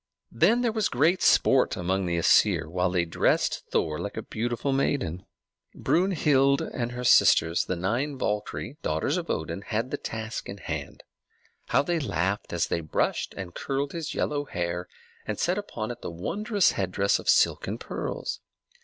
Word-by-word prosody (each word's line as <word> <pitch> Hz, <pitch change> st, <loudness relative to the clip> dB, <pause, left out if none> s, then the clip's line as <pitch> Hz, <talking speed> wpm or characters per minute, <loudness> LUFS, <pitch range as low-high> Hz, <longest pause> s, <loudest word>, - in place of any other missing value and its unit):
Then 200 Hz, -, +3 dB
there 235 Hz, -, +2 dB
was 220 Hz, -2 st, 0 dB
great 175 Hz, +3 st, +2 dB
sport -, -, +4 dB
among 95 Hz, +1 st, -1 dB
the 85 Hz, -1 st, 0 dB
Æsir, 85 Hz, -, +4 dB
while 90 Hz, +3 st, 0 dB
they 90 Hz, -1 st, +1 dB
dressed 80 Hz, -, 0 dB
Thor 75 Hz, -1 st, 0 dB
like 100 Hz, -, -5 dB
a -, -, -3 dB
beautiful 120 Hz, +4 st, -2 dB
maiden. 130 Hz, -, -1 dB, 0.5 s
Brunhilde 150 Hz, -7 st, +2 dB
and 120 Hz, -1 st, -4 dB
her 125 Hz, 0 st, -5 dB
sisters, 85 Hz, -7 st, +5 dB
the 95 Hz, -, -2 dB
nine 120 Hz, +11 st, -1 dB
Valkyrie, 105 Hz, +4 st, -3 dB
daughters 80 Hz, -, 0 dB
of 170 Hz, -1 st, -4 dB
Odin, 80 Hz, +4 st, -3 dB
had 115 Hz, +4 st, -3 dB
the -, -, -1 dB
task 110 Hz, 0 st, -5 dB
in 100 Hz, -, -6 dB
hand. 90 Hz, -, -6 dB, 0.6 s
How 140 Hz, +3 st, +3 dB
they 170 Hz, +3 st, 0 dB
laughed 100 Hz, -, -1 dB
as 85 Hz, -1 st, +1 dB
they 85 Hz, -, -2 dB
brushed 75 Hz, -, -1 dB
and 90 Hz, -2 st, -6 dB
curled 140 Hz, +1 st, -2 dB
his 165 Hz, -3 st, -5 dB
yellow 145 Hz, -1 st, -1 dB
hair, 85 Hz, -5 st, -3 dB, 0.4 s
and -, -, -2 dB
set 180 Hz, +3 st, 0 dB
upon 120 Hz, -, -5 dB
it 120 Hz, -, -9 dB
the -, -, -5 dB
wondrous 200 Hz, -, +1 dB
headdress 95 Hz, +1 st, 0 dB
of -, -, -4 dB
silk -, -, +3 dB
and -, -, -3 dB
pearls! -, -, -4 dB
115 Hz, 170 wpm, -27 LUFS, 90-145 Hz, 0.6 s, sisters